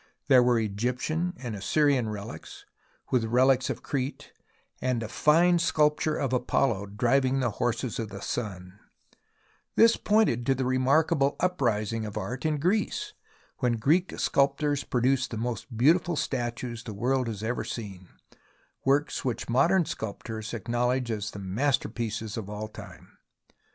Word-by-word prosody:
There 130 -2 +7
were 125 -1 +3
Egyptian 125 - -2
and 120 -4 -5
Assyrian 130 +3 +2
relics, 105 -1 -8 0.5
with 125 -3 +2
relics 130 +3 +3
of - - -4
Crete, 135 0 -4 0.5
and 125 -3 0
a - - -4
fine 170 +8 +4
sculpture 155 -1 +2
of 135 -3 -1
Apollo 115 -4 +1
driving 130 +6 +1
the 125 -3 0
horses 120 0 -1
of 110 -2 -3
the 100 -1 -8
Sun, 95 -3 -5 1.0
which 230 0 +5
pointed 210 - +3
to 135 - +3
the 130 0 -1
remarkable 140 +3 +2
uprising 115 - 0
of 105 - -7
art 125 +5 -3
in 155 -1 0
Greece, 210 - 0 0.5
when 125 -2 +1
Greek 155 +11 +1
sculptors 140 +1 +1
produced 130 +1 +1
the 115 - -5
most 115 +1 -4
beautiful 170 +7 +3
statues 120 -3 -3
the 110 -4 -7
world 125 +4 0
has 110 -2 -5
ever 120 +2 -1
seen, 95 -5 -7 0.8
works 140 +2 +1
which 125 -3 -3
modern 165 +9 +3
sculptors 110 -1 -5
acknow 120 +2 -1
ledge 125 -1 0
as 110 0 -3
the 105 - -9
masterpieces 110 +1 -2
of 105 -3 -5
all 105 +1 -5
time. 100 -5 -13
125 Hz, 145 wpm, -27 LUFS, 110-140 Hz, 1.0 s, There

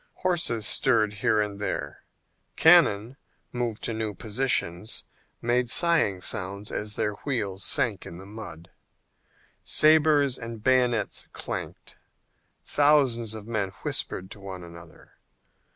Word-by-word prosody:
Horses 165 - +1
stirred 110 -2 +3
here 110 - +2
and 105 -1 -2
there, 105 - -5 0.5
cannon, 135 -8 +4 0.3
moved 120 -3 -3
to 115 - -1
new 110 -2 -3
positions, 110 -4 0 0.4
made 120 +1 +1
sighing 160 - +3
sounds 100 +3 -3
as 105 0 -3
their 105 - -1
wheels 100 -8 -3
sank - - 0
in 85 - -9
the 95 - -11
mud; 95 -5 -10 0.9
sabres 150 -3 +4
and 115 -2 -8
bayonets 125 -4 +1
clanked, - - -7 0.7
thousands 135 -7 +2
of 110 -2 -8
men 110 -4 -2
whispered 95 +1 -3
to 105 - -10
one 95 -2 -8
another. 85 -1 -13
110 Hz, 120 wpm, -26 LUFS, 100-130 Hz, 0.9 s, cannon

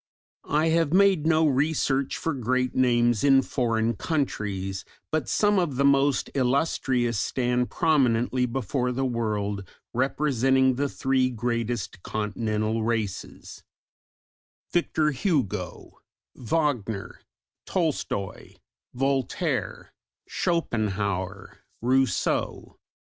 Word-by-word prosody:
I 155 +2 +2
have 165 -1 +2
made 190 -5 +4
no 160 0 +4
research 140 -1 +1
for 165 - -2
great 130 0 0
names 120 -3 +2
in 135 -1 +5
foreign 115 -3 0
countries, 100 - -2 0.3
but 155 - -1
some 205 -2 +3
of 165 -7 -1
the 140 +2 +2
most 140 -1 +3
illustrious 125 -4 +1
stand 125 -1 0
prominently 125 -5 +2
before 125 +1 -1
the 135 +2 -1
world 105 -5 -2 0.3
representing 130 0 +2
the 140 +3 -1
three 130 -1 +1
greatest 115 -4 -3
continental 110 +1 -2
races: 110 -4 -4 1.1
Victor 160 -3 +1
Hugo, 125 - -2 0.3
Wagner, 120 -6 -2 0.5
Tolstoy, 155 - -2 0.4
Voltaire, 135 -1 -1 0.3
Schopenhauer, 100 - -2 0.2
Rousseau. 130 +2 0
125 Hz, 90 wpm, -26 LUFS, 115-145 Hz, 1.1 s, in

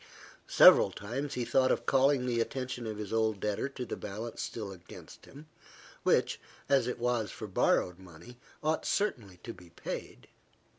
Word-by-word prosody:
Several - - +7
times 135 +8 -5
he 125 - -2
thought 130 +1 +3
of - - -1
calling 135 -1 +3
the 120 -2 0
attention 125 -1 -4
of 110 -1 -5
his 105 0 -6
old 110 -2 +1
debtor 105 +6 -2
to 130 -2 -6
the - - -5
balance 110 +3 -6
still 105 -4 -5
against 90 -3 -13
him, 145 +3 -13 0.6
which, - - +2 0.3
as 135 -4 +3
it 125 - -3
was 120 -3 -1
for 110 - -7
borrowed 90 -2 +1
money, 95 +7 -14 0.2
ought 155 +1 0
certainly 115 - -2
to 115 - -6
be 90 -1 -16
paid. 85 - -7
115 Hz, 165 wpm, -31 LUFS, 105-130 Hz, 0.6 s, Several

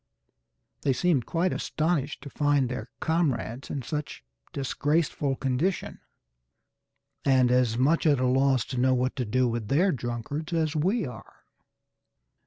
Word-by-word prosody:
They 135 - +2
seemed 140 -3 +1
quite 175 +2 0
astonished 155 -3 -1
to 140 - -7
find 145 -3 +2
their 125 - -5
comrades 135 -7 -1
in 135 - -4
such 150 - -5 0.3
disgraceful 145 0 0
condition, 135 +9 -1 1.2
and 130 -2 +4
as 125 -2 +2
much 155 +6 +3
at 145 -3 +4
a 130 - +1
loss 130 -1 +3
to 125 - -1
know 130 +1 +3
what 130 +1 0
to 125 - -1
do 125 +4 +1
with 115 -2 -3
their 175 - +3
drunkards 125 +5 -4
as 160 -2 0
we 190 +7 +1
are. 125 -5 -11
135 Hz, 140 wpm, -27 LUFS, 125-155 Hz, 1.2 s, and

